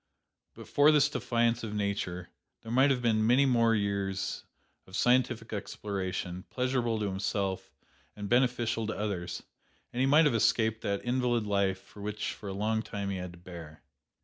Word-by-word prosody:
But - - -11
for 145 +1 +5
this 150 -1 +5
defiance 120 -4 0
of 105 -1 -4
Nature, 100 -4 -2 0.3
there 115 - -7
might 130 +4 +5
have 125 -3 +1
been 110 -2 +2
many 130 +4 +5
more 115 -3 +3
years 100 -2 -2 0.4
of 95 - -10
scientific 120 -2 +2
exploration, 95 -3 -4
pleasurable 125 -3 0
to 105 - -1
himself 95 0 -2 0.4
and 105 -1 -5
beneficial 120 -2 +1
to 110 - -3
others; 90 -4 -3 0.5
and 120 - -3
he 130 - +3
might 150 +4 +6
have 145 - +3
escaped 110 0 +2
that 100 0 -2
invalid 120 -2 +1
life 100 -2 -1
which 105 0 -4
for 100 - -8
a - - -3
long 110 +3 0
time 100 -3 -4
he 95 - -2
had 90 -1 -6
to - - -13
bear. 85 -3 -11
110 Hz, 170 wpm, -30 LUFS, 100-120 Hz, 0.5 s, might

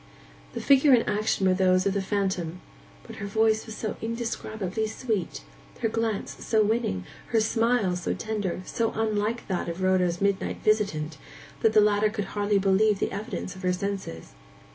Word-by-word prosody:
The - - -4
figure 275 0 +5
and 235 -2 +4
action 210 -2 +1
were 185 - +4
those 185 0 +3
of 200 - +2
the 200 - 0
phantom; 190 -4 -2 0.4
but 225 -1 -11
her 200 - -5
voice 220 +2 +2
was 220 - -7
so 215 - -3
indescribably 220 -3 -3
sweet, 215 -4 -3 0.4
her 225 - +1
glance 225 -2 -2
so 220 -1 +3
winning, 210 - 0 0.2
her 230 - +2
smile 225 -3 +2
so 175 - -2
tender, 205 -5 -3
so 230 -1 -1
unlike 220 +1 -1
that 185 -3 -2
of 170 +3 -4
Rhoda's 180 -2 +2
midnight 200 -1 0
visitant, 160 -9 +1 0.4
that 220 - +3
the 215 - +7
latter 210 0 +3
could 210 -2 -3
hardly 205 0 +1
believe 200 +2 +3
the - - -1
evidence 200 -2 -5
of 185 - -10
her 180 -1 +1
senses. 190 - -4
205 Hz, 170 wpm, -26 LUFS, 190-220 Hz, 0.4 s, the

